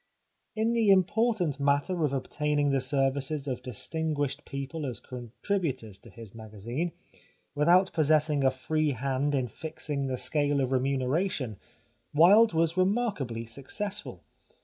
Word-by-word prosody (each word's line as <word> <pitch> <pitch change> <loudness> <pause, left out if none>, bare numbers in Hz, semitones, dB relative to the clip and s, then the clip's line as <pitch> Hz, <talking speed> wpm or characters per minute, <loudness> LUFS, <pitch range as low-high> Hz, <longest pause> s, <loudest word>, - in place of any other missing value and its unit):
In 220 +2 +1
the 225 -3 +2
important 190 - +2
matter 145 +5 +1
of 150 - +1
obtaining 145 +1 0
the 135 -1 +1
services 135 +2 0
of 130 -2 -3
distinguished 145 +1 -3
people 140 +2 -5
as 125 - -4
contributors 125 - -4
to - - -15
his 115 -4 -12
magazine, 115 - -4 0.6
without 175 +6 +4
possessing 155 -2 +2
a 135 - +5
free 150 +3 -1
hand 135 +3 -1
in 130 -2 0
fixing 145 +2 -4
the 130 -1 -2
scale 145 +1 +1
of 130 -1 0
remuneration, 130 - 0 0.6
Wilde 205 +8 +7
was 165 +1 +1
remarkably 185 - 0
successful. 190 - -5
145 Hz, 125 wpm, -28 LUFS, 130-165 Hz, 0.6 s, Wilde